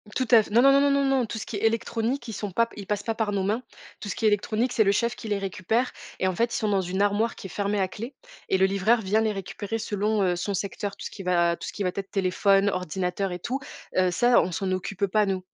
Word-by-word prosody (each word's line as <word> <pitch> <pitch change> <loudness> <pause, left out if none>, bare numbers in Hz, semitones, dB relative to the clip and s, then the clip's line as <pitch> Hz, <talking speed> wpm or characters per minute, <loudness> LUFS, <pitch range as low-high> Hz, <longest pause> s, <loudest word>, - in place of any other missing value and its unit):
Tout 255 -2 0
à 230 - +8
f 210 - -9
non, 235 +4 +4
non, 275 - +7
non, 285 - +4
non, 280 0 +3
non. 270 -2 +2
Tout 225 - -5
ce - - -5
qui 215 - -5
est - - -3
électronique, 230 +3 0
ils 225 - -5
sont 205 -1 -4
pap 230 +4 +1
ils 200 -2 -8
passent 205 -1 -1
pas 225 - -1
par 220 -2 -1
nos 195 -2 0
mains. 215 +5 0 0.4
Tout 205 - -6
ce - - -3
qui - - -2
est - - +7
électronique, 215 +4 0
c'est 220 - +4
le 200 - +3
chef 235 +4 0
qui 225 - -8
les 205 -1 0
récupère 200 +5 -1 0.3
et - - 0
en 185 - 0
fait, 235 +4 +1
ils - - 0
sont 215 - -1
dans 195 -2 +2
une 190 +3 -1
armoire 205 +3 +1
qui - - -11
est - - -13
fermée 205 0 -1
à 190 - +2
clé 230 +8 -8 0.3
et 190 - +3
le 190 - +4
livreur 200 +4 +2
vient 210 +3 +1
les 220 -1 +1
récupérer 205 +2 -4
selon, 210 -1 0
heu, 180 -1 +2
son 195 +3 -2
secteur. 200 +1 -4
Tout - - -8
ce - - -5
qui 200 - -9
va 170 -2 +2
tout - - -8
ce - - -6
qui 205 - -3
va 180 - 0
t 200 - -5
être 195 - -22
téléphone, 195 +1 +2
ordinateur 180 +1 -2
et 180 - -3
tout, 255 +9 -3 0.4
heu, 185 -1 +3
ça 240 +6 +4
on 180 - -2
s'en 185 +2 -2
occupe 185 +1 -1
pas 210 +1 +2
nous. 190 -1 -1
205 Hz, 295 wpm, -26 LUFS, 190-225 Hz, 0.4 s, à